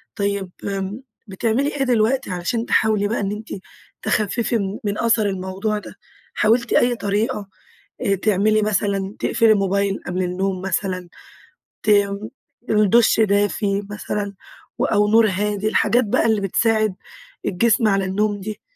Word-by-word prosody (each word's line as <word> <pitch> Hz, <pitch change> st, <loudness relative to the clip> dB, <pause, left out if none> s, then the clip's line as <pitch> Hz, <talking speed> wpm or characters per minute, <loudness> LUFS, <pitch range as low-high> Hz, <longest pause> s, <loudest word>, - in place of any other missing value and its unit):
طيب 200 Hz, -2 st, -2 dB
بـم 200 Hz, +4 st, -4 dB, 0.3 s
بتعملي 230 Hz, +8 st, 0 dB
إيه 275 Hz, -, 0 dB
دلوقتي 245 Hz, -2 st, +1 dB
عشان 180 Hz, +7 st, -2 dB
تحاولي 210 Hz, -2 st, +2 dB
بقى 230 Hz, -, -1 dB
إن 200 Hz, 0 st, -2 dB
أنتِ 215 Hz, +1 st, -7 dB, 0.5 s
تخففي 225 Hz, +3 st, 0 dB
من 200 Hz, 0 st, -3 dB
من 205 Hz, 0 st, -2 dB
أثر 225 Hz, -2 st, +2 dB
الموضوع 190 Hz, +3 st, -3 dB
ده؟ -, -, -12 dB, 0.4 s
حاولتِ 230 Hz, +3 st, +2 dB
أي 245 Hz, 0 st, +3 dB
طريقة، 205 Hz, 0 st, -2 dB, 0.7 s
تعملي 215 Hz, +1 st, +3 dB
مثلًا، 200 Hz, -1 st, -1 dB
تقفّلي 225 Hz, -1 st, +3 dB
الموبايل 200 Hz, -1 st, +1 dB
قبل 180 Hz, +1 st, -1 dB
النوم 185 Hz, +1 st, -2 dB
مثلًا؟ 185 Hz, -1 st, -2 dB, 0.7 s
ت 215 Hz, -, +3 dB, 0.8 s
دُش 215 Hz, +2 st, +4 dB
دافي 205 Hz, -1 st, +1 dB
مثلًا 205 Hz, -1 st, -4 dB, 0.6 s
أو 210 Hz, 0 st, +3 dB
نور 225 Hz, 0 st, +5 dB
هادي؟ 205 Hz, +2 st, -1 dB
الحاجات 230 Hz, +3 st, +2 dB
بقى 205 Hz, -, +1 dB
اللي 215 Hz, -2 st, +2 dB
بتساعد 215 Hz, 0 st, +1 dB, 0.5 s
الجسم 225 Hz, +4 st, +2 dB
على 195 Hz, -1 st, +1 dB
النوم 205 Hz, +2 st, 0 dB
دي. 210 Hz, +1 st, -6 dB
205 Hz, 130 wpm, -21 LUFS, 195-220 Hz, 0.8 s, نور